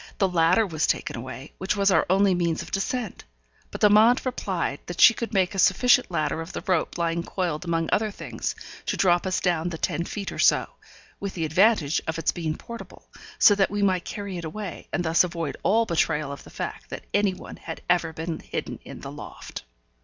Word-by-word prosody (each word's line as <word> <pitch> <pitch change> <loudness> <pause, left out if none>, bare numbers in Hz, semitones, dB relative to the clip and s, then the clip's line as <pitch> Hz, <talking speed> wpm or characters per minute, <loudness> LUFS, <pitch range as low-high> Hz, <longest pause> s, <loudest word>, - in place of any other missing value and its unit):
The 195 - +3
ladder 180 +4 +3
was 160 -5 -1
taken - - -1
away, 130 +4 -8
which 190 +2 -1
was 200 0 +3
our - - +3
only 195 +1 +4
means 170 -2 0
of - - -12
descent. 215 +2 -3 0.5
But - - -7
Amante 215 +4 +6
replied 190 - -2
that 175 - -6
she 230 - +9
could 230 +1 -5
make 190 -2 +1
a 195 - -3
sufficient 245 +7 +4
ladder 160 -2 -1
of 165 - -8
the - - -5
rope 185 -5 0
lying 170 0 0
coiled 175 -2 -3
among 165 -1 0
other 215 0 +2
things, 200 - -5 0.3
to - - -1
drop 175 -1 +3
us 185 - 0
down 175 -1 0
the 165 - -5
ten 170 - -1
feet 200 0 -5
or - - -7
so - - +4 0.5
with 200 -1 -5
the 165 -3 -1
advantage 165 -2 +3
of 160 +1 -2
its 165 - +1
being 160 -3 -3
portable, 235 0 -11 0.3
so 205 - +7
that 195 -1 +2
we 205 0 -1
might 185 -3 +2
carry 200 -3 -5
it - - -7
away, 185 +3 -6
and 175 - -1
thus 160 +2 +4
avoid 170 -4 -3
all 225 +3 +3
betrayal 155 -5 0
of 140 - -8
the - - -12
fact - - -6
that - - -7
any 200 -2 +2
one - - -10
had 160 - -8
ever 175 -2 +2
been 160 0 -4
hidden - - -5
in - - -10
the - - -7
loft. - - -9
180 Hz, 215 wpm, -25 LUFS, 165-200 Hz, 0.5 s, she